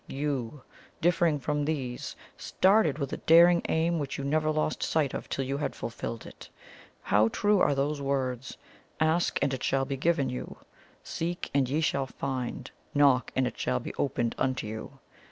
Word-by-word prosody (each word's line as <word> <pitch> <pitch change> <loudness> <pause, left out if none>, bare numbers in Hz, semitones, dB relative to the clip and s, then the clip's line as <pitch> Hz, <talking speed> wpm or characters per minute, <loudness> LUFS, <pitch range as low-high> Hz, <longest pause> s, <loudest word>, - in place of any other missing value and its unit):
YOU, 135 -2 -3 0.4
differing 170 -2 +2
from 150 +2 -1
these, 135 -5 -3 0.2
started 190 -6 +2
with 140 -3 -3
a - - -2
daring 170 +1 +6
aim 165 +1 +1
which 140 -2 -4
you 140 - -4
never 155 +2 +1
lost 155 0 -1
sight 150 -4 +1
of - - -5
till 135 - -2
you 135 +2 -2
had 140 -2 -2
fulfilled 115 0 -5
it. - - -12 0.5
How 105 +2 +4
true 205 - +2
are 145 - +3
those 140 +1 -1
words: 130 -2 -2 0.4
'Ask, 160 +2 +2
and 140 -1 +1
it 130 - -4
shall 135 0 +1
be 135 0 -3
given 145 -1 +1
you; 125 0 -6 0.5
seek, 175 +2 -4
and 135 -3 +2
ye 150 +4 +1
shall 140 -4 0
find; 130 -2 -4 0.2
knock, 140 -3 +4
and 130 - +2
it - - -5
shall 65 0 0
be - - -7
opened 120 -4 -1
unto 130 -3 0
you'! 110 +1 -7
140 Hz, 175 wpm, -28 LUFS, 130-155 Hz, 0.5 s, daring